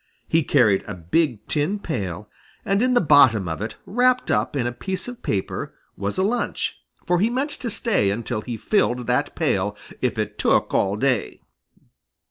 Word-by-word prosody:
He 165 - +3
carried 120 -10 +3
a 105 - -5
big 110 - 0
tin 155 +7 0
pail, 105 - -4 0.4
and 200 0 +1
in 250 0 +2
the - - +5
bottom 130 - +5
of 80 +3 -4
it, 110 +1 -4
wrapped 250 +3 +2
up 105 +7 0
in 130 -4 0
a 120 - 0
piece 190 - -5
of 245 0 -8
paper, 95 -2 -3 0.2
was 100 +1 -3
a 190 - +2
lunch, 235 +4 -1 0.3
for 175 -1 +2
he 215 +5 +3
meant 265 +5 -1
to 255 -4 -5
stay 220 - +1
until 110 +2 -2
he 120 0 -5
filled 125 - +1
that - - 0
pail, - - 0 0.2
if - - 0
it - - -3
took - - +2
all 100 +1 +2
day. 125 - -1
140 Hz, 180 wpm, -23 LUFS, -, 0.4 s, the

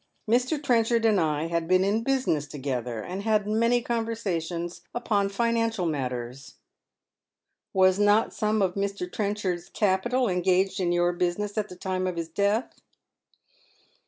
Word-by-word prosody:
Mr. 250 +7 +2
Trenchard 235 -4 +2
and 215 -3 +4
I 155 -2 0
had 165 0 -1
been 185 +1 +4
in 205 +3 +1
business 240 - 0
together, 125 -5 -4
and 185 +2 -5
had 210 -1 +1
many 230 +3 +2
conversations 180 -8 -3
upon 205 -4 +1
financial 230 -1 0
matters." 130 -3 -4 0.6
" - - -59
Was 185 0 +4
not 205 +2 +3
some 215 -1 +1
of 185 -2 0
Mr. 200 -1 -2
Trenchard's 200 -4 -2
capital 230 +6 +1
engaged 185 +1 +1
in 175 -2 +1
your 175 0 +2
business 180 +4 -1
at 210 -1 -2
the 180 - -9
time 185 0 -2
of 180 -2 -3
his 165 -1 -3
death 200 +7 -1
195 Hz, 145 wpm, -26 LUFS, 175-220 Hz, 0.6 s, and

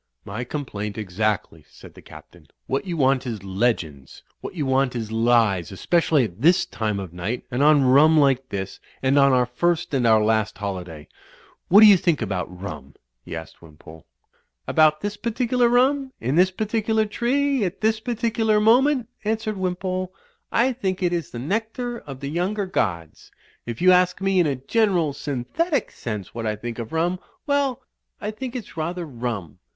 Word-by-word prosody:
"My 110 +5 -5
complaint, 105 -7 -5
exactly," 105 -5 -2
said - - -15
the - - -14
Captain. 85 -3 -15 0.2
"What 135 +6 -2
you 170 -2 -3
want 135 -2 +2
is 110 -5 -5
legends. 95 - -2 0.2
What - - -8
you 150 -5 -2
want 130 -1 +1
is 110 -2 -4
lies, 110 -6 +2
especially 155 - +2
at 105 -1 -6
this 175 +5 +4
time 110 -3 -3
of 95 -3 -7
night, 100 +8 -4
and 125 +2 -1
on 145 -1 +5
rum 150 +5 +5
like 135 -2 +2
this, 95 -1 -5 0.2
and 135 +2 +3
on 140 0 +5
our 125 -1 +3
first 175 +7 -1
and 125 -3 +2
our 110 -1 +5
last 110 -1 +1
holiday. 90 -7 -6 0.6
What 200 +4 +7
do - - +10
you 205 -3 +8
think 170 -3 +1
about 95 -5 -2
rum 90 -7 -9
?" - - -55
he - - -6
asked 80 0 -9
Wimpole. 80 -1 -15 0.6
"About 155 -1 +3
this 205 0 -4
particular 240 +2 +1
rum, 260 +2 +2
in 130 +5 -1
this 180 +2 +5
particular 220 +2 0
tree, 260 +4 0
at 185 0 -3
this 220 0 +2
particular 225 -2 0
moment," 250 +3 +3 0.2
answered 220 0 -2
Wimpole, 185 0 -2 0.4
"I 255 +3 +2
think 190 -6 -3
it 175 -1 +1
Is 170 -4 -2
the - - -8
nectar 225 - -3
of 135 -2 -10
the 140 - -4
younger 190 +5 -1
gods. 85 - -3 0.4
If 120 +6 -5
you 185 - +7
ask 180 0 +3
me 195 -1 +1
in 170 - +3
a 140 - 0
general, 175 - +1
synthetic 150 - -2
sense 105 -5 -6
what 115 -1 -4
I 105 - -1
think 115 +2 -6
of 115 -1 -6
rum 175 +3 0
— 370 - -41
well, 285 -4 0 0.4
I 210 - -4
think 250 +3 -7
it's 235 -9 -7
rather 170 +2 -3
rum." 115 - -5
150 Hz, 180 wpm, -23 LUFS, -, 0.6 s, do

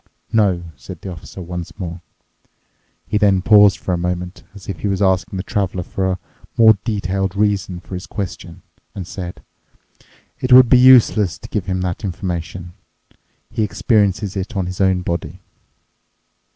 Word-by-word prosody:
"No," 100 -6 +2
said 90 -4 -10
the 95 - -7
Officer 90 +2 -9
once 90 +1 -7
more. 85 -3 -6 1.0
He 105 +5 0
then 100 -3 +3
paused 105 -1 +6
for 90 - -3
a 85 - -1
moment, 90 +1 -3
as 100 - -12
if 95 - -5
he - - -2
was 100 -1 -1
asking 95 -1 +1
the 95 - -3
Traveler 95 -3 -2
for 95 +2 -2
a 90 - -6 0.4
more 110 -2 +7
detailed 95 -3 -2
reason 100 -3 0
for 90 - -12
his 90 0 -6
question, 90 -4 -6 0.3
and 95 - -5
said, 90 0 -7 1.0
"It 130 - -2
would 125 -1 +8
be 125 - +6
useless 120 -7 +5
to - - -12
give 100 -4 -3
him 95 -1 -1
that 90 +2 -3
information. 90 -2 -5 0.8
He - - -2
experiences 105 -2 +1
it 100 +3 -4
on 95 - 0
his 90 +2 -4
own 95 -1 +2
body." 85 0 -4
95 Hz, 165 wpm, -19 LUFS, 90-105 Hz, 1.0 s, would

